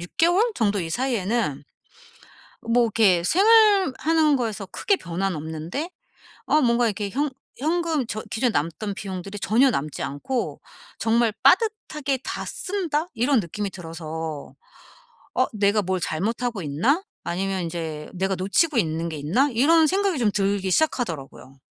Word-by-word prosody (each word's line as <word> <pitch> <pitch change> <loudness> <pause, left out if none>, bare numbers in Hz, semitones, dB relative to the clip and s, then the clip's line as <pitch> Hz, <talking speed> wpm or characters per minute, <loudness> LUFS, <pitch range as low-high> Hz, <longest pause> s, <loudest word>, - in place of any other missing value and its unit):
6 175 - -8
개월 350 +6 +4
정도 205 -3 +1
이 165 - -4
사이에는 225 - -1 1.1
뭐 240 +1 +4
이렇게 200 -6 +3
생활하는 365 - +4
거에서 220 -5 -3
크게 400 - 0
변화는 180 - -3
없는데 160 - -5 0.6
어 305 - +4
뭔가 235 0 +3
이렇게 205 -2 -2
현 285 +4 -1 0.3
현금 320 -2 0
저 215 -1 -4
기존에 240 +2 +1
남던 195 +4 -2
비용들이 195 0 -6
전혀 245 +8 +4
남지 150 - -3
않고 145 - -3 0.4
정말 230 0 +2
'빠듯하게 305 - +2
다 - - -4
쓴다.' 350 -5 -2
이런 245 +1 +2
느낌이 200 +3 -4
들어서 160 -3 -6 0.8
'어 255 - +3
내가 205 0 +2
뭘 185 0 -1
잘못하고 210 +6 -2
있나?' 200 - +1 0.2
아니면 190 +1 -2
인제 160 -3 -5
'내가 190 +1 0
놓치고 220 - +1
있는 165 -3 0
게 160 - -5
있나?' 200 - +2
이런 315 +7 +5
생각이 385 -3 +1
좀 225 -4 +2
들기 195 -1 0
시작하더라고요. 165 - -2
215 Hz, 305 characters per minute, -24 LUFS, 175-280 Hz, 1.1 s, 이런